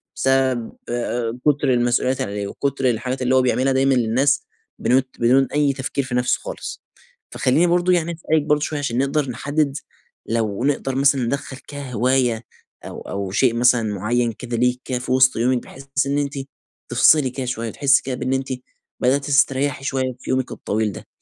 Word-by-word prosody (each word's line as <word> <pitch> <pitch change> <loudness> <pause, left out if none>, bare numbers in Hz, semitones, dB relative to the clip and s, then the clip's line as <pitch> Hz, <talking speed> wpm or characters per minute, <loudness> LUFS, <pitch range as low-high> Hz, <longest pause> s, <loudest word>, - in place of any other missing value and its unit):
بسبب 130 -3 +1 0.2
آآ، 120 0 -2
كتر 145 -3 +3
المسؤوليات 125 +2 +1
اللي 100 - -3
عليه 100 -1 -3
وكتر 135 +2 -1
الحاجات 125 +3 -2
اللي 130 +1 +2
هو 130 - +5
بيعملها 130 +1 +1
دايمًا 135 +1 +3
للناس 130 +4 +2 0.3
بنوت 130 +1 +2
بدون 130 +3 +4
أي 145 -2 +2
تفكير 135 +1 -3
في 125 -1 -4
نفسه 125 0 +1
خالص. - - -7 0.5
فخلّيني 150 +8 +2
برضه 175 +1 +3
يعني 170 -1 +1
أسألِك 160 -1 0
برضه 150 0 +1
شوية 150 -1 -2
عشان 125 -4 -2
نقدر 140 0 0
نحدد، 145 +4 -1 0.5
لو 110 -1 -1
نقدر 135 -2 0
مثلًا 135 -1 +3
ندخَل 135 +2 -3
كهواية 125 -3 0 0.4
أو - - -8
أو 100 -1 -5
شيء 120 +3 +3
مثلًا 120 -1 +4
مُعيّن 115 +4 0
كده 120 +1 -5
ليكِ 125 +1 +1
كده 125 -2 -2
في 125 - -5
وسط 130 0 +5
يومِك 120 +2 +1
بحيث 135 +1 -12 0.2
إن 140 +1 0
أنتِ 145 0 -1 0.6
تِفصلي 150 -5 +5
كده 130 0 -5
شوية، 115 -2 -3
تحسي 140 -1 +3
كده 130 -1 -3
بأن 130 +1 -2
أنتِ 135 0 -1 0.5
بدأتي 135 +3 +1
تستريحي 140 0 +2
شوية 130 -2 -1
في - - -10
يومِك 130 -1 0
الطويل 105 0 -2
ده. - - -10
130 Hz, 175 wpm, -21 LUFS, 120-140 Hz, 0.6 s, هو